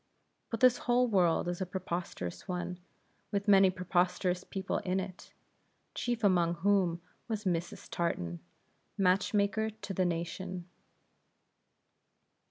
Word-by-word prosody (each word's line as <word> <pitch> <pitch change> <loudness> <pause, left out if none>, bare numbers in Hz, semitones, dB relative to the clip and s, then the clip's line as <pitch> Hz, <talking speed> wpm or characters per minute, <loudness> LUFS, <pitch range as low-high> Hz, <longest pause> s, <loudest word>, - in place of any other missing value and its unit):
But 230 -3 -4
this 250 -1 +6
whole 245 +1 +3
world 180 -6 +3
is 175 +1 -3
a - - +1
preposterous 170 - -4
one, 180 0 -3 0.5
with 200 0 -1
many 195 -2 +7
preposterous 180 0 0
people 190 -1 -2
in 185 +1 -1
it; 185 -1 -7 0.6
chief 240 -2 -2
among 175 -4 +3
whom 180 -1 +2 0.3
was 220 -3 -2
Mrs. 175 -3 -2
Tartan, 85 - -2 0.6
match 195 +2 +2
maker 205 +2 +2
to 205 -2 -7
the 185 0 +1
nation. 175 +1 -3
185 Hz, 120 wpm, -32 LUFS, 175-200 Hz, 0.6 s, many